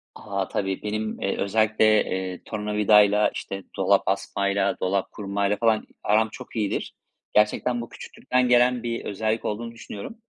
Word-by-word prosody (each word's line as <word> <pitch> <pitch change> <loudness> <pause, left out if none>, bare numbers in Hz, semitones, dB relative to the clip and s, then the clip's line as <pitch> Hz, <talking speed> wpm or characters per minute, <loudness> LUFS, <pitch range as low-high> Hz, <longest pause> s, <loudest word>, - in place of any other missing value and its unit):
A, 100 -2 -3
tabii 95 -1 -2
benim, 110 +1 -3
eee, 100 - -1
özellikle, 110 +2 +2 0.2
eee, 95 -1 -4
tornavidayla, 105 -1 +3
işte, 95 -1 -6
dolap - - +3
asmayla, 100 0 0
dolap 95 +1 -1
kurmayla 100 0 -1
falan 110 -2 +2 0.2
aram 110 +1 +3
çok - - -11
iyidir. 105 -3 -2 0.4
Gerçekten 120 +3 +2
bu 115 - -8
küçüklükten 125 -1 -2
gelen 125 0 +4
bir 115 -1 -3
özellik 110 +2 -2
olduğunu 115 +2 -3
düşünüyorum. 115 - -8
105 Hz, 140 wpm, -25 LUFS, 100-110 Hz, 0.4 s, gelen